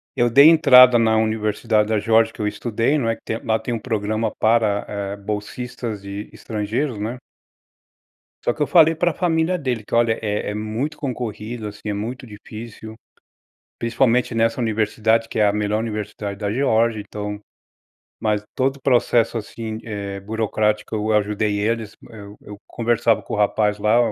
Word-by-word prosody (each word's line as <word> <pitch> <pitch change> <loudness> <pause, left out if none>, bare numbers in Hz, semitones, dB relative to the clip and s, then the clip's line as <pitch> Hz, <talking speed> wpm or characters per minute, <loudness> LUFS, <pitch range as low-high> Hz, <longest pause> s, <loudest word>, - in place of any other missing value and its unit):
Eu 120 -2 +2
dei 140 +6 +8
entrada 125 -6 +7
na 110 -1 +3
Universidade 110 0 +1
da 110 -1 +2
Geórgia 115 +1 +3
que - - -8
eu 105 - 0
estudei, 115 +6 0
não 120 -6 0
é, 115 - 0
que - - -23
tem 110 - -4
lá 110 -1 +1
tem 120 - -4
um 115 - -2
programa 110 -1 -2
para, 110 -2 +2
eh, 100 -1 -4
bolsistas 105 +1 -5
e 100 +1 -7
estrangeiros, 110 +4 -3
né. 110 +4 -4 1.3
Só - - +2
que - - -3
eu - - +2
falei 165 -2 +5
para 175 0 0
família 170 +1 +1
dele 130 -8 -3
que, - - -6
olha 115 -1 +3
é 105 -1 -2
é - - -4
muito 110 +8 -3
concorrido, 115 -4 -5
assim, 105 0 -11
é 105 - -1
muito 120 +5 -5
difícil. 110 +1 -10 0.8
Principalmente 120 +1 +1
nessa 115 +2 +1
Universidade, 110 0 +1
que - - -4
é 105 - +5
a 100 - +4
melhor 105 +1 -1
Universidade 105 -2 -5
da 105 -2 -2
Georgia 115 -3 +1
então 105 0 -6 0.8
mas 105 -1 0
todo 135 +1 0
o - - -27
processo, 120 -2 +2
assim, 110 0 -6
eh, 100 -3 -5
burocrático 105 +1 -1
eu 110 +1 -1
ajudei 105 0 0
eles, 110 0 -2 0.2
eu 105 -2 -11
eu 105 - -11
conversava 115 -1 +1
com - - -6
o - - -2
rapaz 105 0 +1
lá. 105 +3 +3
110 Hz, 170 wpm, -21 LUFS, 105-120 Hz, 1.3 s, dei